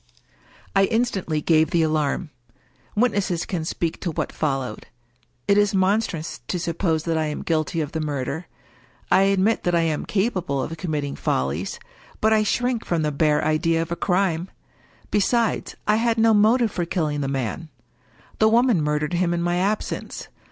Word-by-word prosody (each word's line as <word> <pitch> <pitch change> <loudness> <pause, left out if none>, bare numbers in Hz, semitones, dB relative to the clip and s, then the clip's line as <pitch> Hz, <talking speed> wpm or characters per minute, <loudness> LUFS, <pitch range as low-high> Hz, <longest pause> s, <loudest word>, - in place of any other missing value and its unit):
I 195 0 +5
instantly 195 -9 0
gave 160 -1 +3
the 170 -1 +2
alarm. 155 +1 0 0.6
Witnesses 205 -6 +1
can 175 -5 -3
speak 165 0 -3
to 175 - -3
what 160 - -3
followed. 135 -7 -2 0.6
It 200 0 +5
is 205 -1 +2
monstrous 190 -3 0
to 180 - -1
suppose 165 -2 -1
that 165 -1 0
I 155 - 0
am 150 - -4
guilty 160 0 0
of 150 -1 -4
the 160 - -3
murder. 145 +2 -3 0.6
I - - +6
admit 200 +3 +2
that 175 -1 +1
I 170 - +3
am 160 -2 -1
capable 190 - 0
of 160 +5 -3
committing 150 -4 -3
fol 65 +1 0
lies: 85 +8 -4 0.4
but 220 +1 +3
I 215 - +4
shrink 245 +2 0
from 170 -2 -1
the 150 - 0
bare 150 +1 +2
idea 160 +1 +2
of 165 0 -3
a - - 0
crime. 180 -1 0 0.6
Besides, 225 +2 +1
I 210 0 +4
had 230 0 +1
no 225 0 +5
motive 220 +2 +4
for 175 - -2
killing 155 -4 -1
the 135 - -1
man. 135 +4 -3 0.7
The 220 - +5
woman 235 -5 +3
mur 150 0 0
dered 150 +2 -2
him 175 0 +1
in 170 - -1
my 175 0 +1
absence. 200 +4 -2
170 Hz, 175 wpm, -23 LUFS, 155-205 Hz, 0.7 s, I